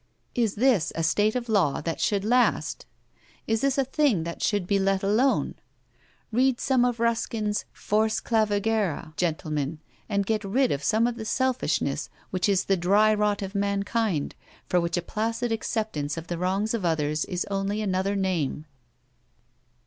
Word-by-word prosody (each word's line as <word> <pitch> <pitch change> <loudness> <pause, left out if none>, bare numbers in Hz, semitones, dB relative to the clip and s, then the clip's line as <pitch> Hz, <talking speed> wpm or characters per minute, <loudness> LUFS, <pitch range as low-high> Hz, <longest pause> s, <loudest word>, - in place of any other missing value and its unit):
Is 230 -4 0
this 220 - +3
a 165 - -1
state 205 +7 +2
of 245 -1 -2
law 200 -10 +2
that 165 - -3
should 205 -2 +1
last? 245 +3 +1 0.6
Is 225 0 0
this 275 -1 +1
a 275 - +2
thing 270 - +2
that 170 0 -6
should 205 -4 +1
be 200 +2 +1
let 195 0 +1
alone? 225 +7 +2 0.8
Read 255 +2 +2
some 260 -2 +2
of 245 -2 0
Ruskin's 225 -2 0
'Fors 215 +1 0
Clavigera,' 210 -7 0
gentlemen, 155 -3 -2 0.3
and 200 -1 0
get 220 +1 0
rid 245 +7 +1
of 140 - -2
some 220 +9 +3
of 240 -1 -1
the 220 - -5
selfishness 260 +2 0 0.2
which 185 +2 0
is 190 -2 +2
the 195 - +3
dry 205 +5 +4
rot 210 -1 +1
of 195 0 -5
mankind, 200 -3 0 0.3
for 180 - +2
which 170 +1 -1
a 175 - -1
placid 230 +4 -2
acceptance 215 -10 -2
of 165 - -5
the 175 -1 -4
wrongs 195 +5 0
of 225 -4 -2
others 155 -2 0
is 180 -3 -2
only 195 +1 -1
another 195 -1 0
name. 175 -6 -1
205 Hz, 165 wpm, -26 LUFS, 180-225 Hz, 0.8 s, dry